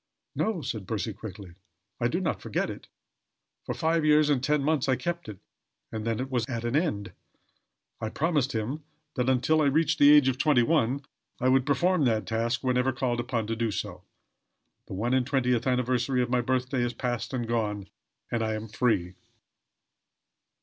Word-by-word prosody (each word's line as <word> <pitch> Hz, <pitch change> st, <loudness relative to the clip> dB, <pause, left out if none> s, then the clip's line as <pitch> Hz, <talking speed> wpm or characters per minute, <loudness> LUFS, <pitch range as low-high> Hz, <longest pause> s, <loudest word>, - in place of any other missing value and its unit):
"No," 210 Hz, -8 st, -1 dB
said 110 Hz, -6 st, -4 dB
Percy 110 Hz, 0 st, -2 dB
quickly. 100 Hz, -3 st, -9 dB, 0.5 s
"I -, -, +2 dB
do -, -, -1 dB
not -, -, -2 dB
forget -, -, -2 dB
it. -, -, -10 dB, 0.8 s
For -, -, -2 dB
five 160 Hz, 0 st, +1 dB
years 150 Hz, 0 st, +4 dB
and 130 Hz, -3 st, +1 dB
ten 150 Hz, 0 st, +2 dB
months 150 Hz, -2 st, +1 dB
I 130 Hz, -, +4 dB
kept 175 Hz, -1 st, -4 dB
it; 105 Hz, -, -8 dB, 0.5 s
and 110 Hz, -1 st, -4 dB
then 115 Hz, -1 st, 0 dB
it 130 Hz, +1 st, -4 dB
was 125 Hz, -3 st, +1 dB
at 115 Hz, -2 st, -3 dB
an 120 Hz, +3 st, -1 dB
end. 145 Hz, -, 0 dB, 0.9 s
I 110 Hz, -, -3 dB
promised 145 Hz, 0 st, 0 dB
him 115 Hz, +7 st, -3 dB, 0.3 s
that, 125 Hz, 0 st, 0 dB
until 130 Hz, +5 st, +3 dB
I -, -, +3 dB
reached 155 Hz, +2 st, +2 dB
the 145 Hz, 0 st, +8 dB
age 150 Hz, -3 st, +7 dB
of 130 Hz, -1 st, 0 dB
twenty 140 Hz, -5 st, +4 dB
one, 140 Hz, -1 st, +1 dB, 0.3 s
I 130 Hz, -, +2 dB
would 130 Hz, +1 st, +3 dB
perform 170 Hz, +2 st, +2 dB
that 110 Hz, -3 st, +1 dB
task 115 Hz, +2 st, -1 dB
whenever 125 Hz, 0 st, +2 dB
called 125 Hz, -2 st, -1 dB
upon 120 Hz, -2 st, -1 dB
to 115 Hz, +1 st, -2 dB
do 115 Hz, 0 st, -1 dB
so. 105 Hz, -, -5 dB, 0.8 s
The -, -, -6 dB
one 120 Hz, +6 st, -1 dB
and 130 Hz, -1 st, +3 dB
twentieth 125 Hz, -2 st, +1 dB
anniversary 125 Hz, 0 st, +1 dB
of 120 Hz, -, -4 dB
my 125 Hz, -1 st, +3 dB
birthday 130 Hz, +1 st, 0 dB
is 120 Hz, 0 st, -1 dB
past 120 Hz, -1 st, -3 dB
and 120 Hz, -3 st, -2 dB
gone; 105 Hz, -4 st, -1 dB, 0.4 s
and 115 Hz, -, 0 dB
I 110 Hz, 0 st, 0 dB
am 110 Hz, +1 st, -5 dB
free." 105 Hz, -6 st, 0 dB
125 Hz, 185 wpm, -27 LUFS, 115-140 Hz, 0.9 s, the